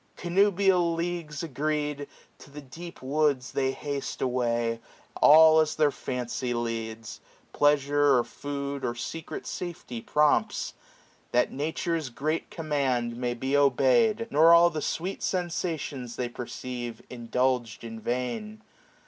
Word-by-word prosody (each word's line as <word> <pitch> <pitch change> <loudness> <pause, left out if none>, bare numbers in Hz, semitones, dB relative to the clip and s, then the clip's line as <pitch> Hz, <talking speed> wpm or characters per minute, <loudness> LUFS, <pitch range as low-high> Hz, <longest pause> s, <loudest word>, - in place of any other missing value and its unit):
Connubial 180 -1 +2
leagues 165 -3 -3
agreed, 150 -1 -2 0.3
to - - -14
the 145 +1 -9
deep 165 +4 -10
woods 140 -2 +1
They 135 -1 0
haste 140 0 -5
away, 120 -2 0 0.4
all 160 +1 +8
as 155 -1 +1
their 150 -2 +3
fancy 125 -1 -3
leads. 115 -1 -4 0.3
Pleasure, 145 -1 +3
or 120 - +2
food, 140 +1 -5
or 120 - -1
secret 160 +7 -6
safety 160 -9 -6
prompts; 150 +3 +1 0.6
630 - - +2
That - - -13
Nature's 160 +1 -2
great 155 +6 -2
command 135 -7 -1
may 120 0 -2
be 130 +3 -1
obeyed. 145 - +3
Nor 160 +3 +6
all 170 +1 +6
the 155 -2 -3
sweet 185 +6 -3
sensations 160 -8 -3
they 125 -1 -2
perceive 120 -1 -6
Indulged 125 -1 -1
in 115 -1 -7
vain. 125 - -4
140 Hz, 125 wpm, -27 LUFS, 125-160 Hz, 0.6 s, all